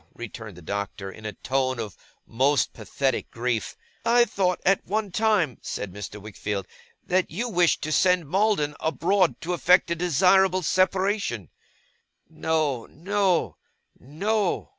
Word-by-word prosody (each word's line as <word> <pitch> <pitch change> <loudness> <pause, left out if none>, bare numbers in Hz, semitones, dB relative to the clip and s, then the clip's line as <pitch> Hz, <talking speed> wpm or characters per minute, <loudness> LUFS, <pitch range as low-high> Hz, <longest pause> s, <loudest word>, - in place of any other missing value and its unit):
returned 110 -4 -8
the 90 - -12
Doctor, 100 +1 -4
in 110 +2 -8
a 105 - -5
tone 130 -1 -1
of 105 -4 -5 0.3
most 135 +5 +1
pathetic 135 -1 -2
grief. 120 -1 -2 0.3
'I 240 +1 +5
thought, 190 -4 0
at 195 +1 +3
one 210 -1 -2
time,' 190 - +1
said 95 -3 -5
Mr. 105 +1 -7
Wickfield, 105 -1 -4 0.4
'that 185 0 +1
you 220 +10 -3
wished 175 -6 +2
to 155 - -2
send 180 -1 +3
Maldon 185 -4 +1
abroad 165 +5 +1
to 175 +2 -2
effect 175 +2 +4
a - - +2
desirable 185 +3 +3
separation.' 185 - 0 0.8
'No, 155 -6 -1
no, 190 +2 0 0.4
no! 195 - -1
160 Hz, 135 wpm, -25 LUFS, 120-190 Hz, 0.8 s, I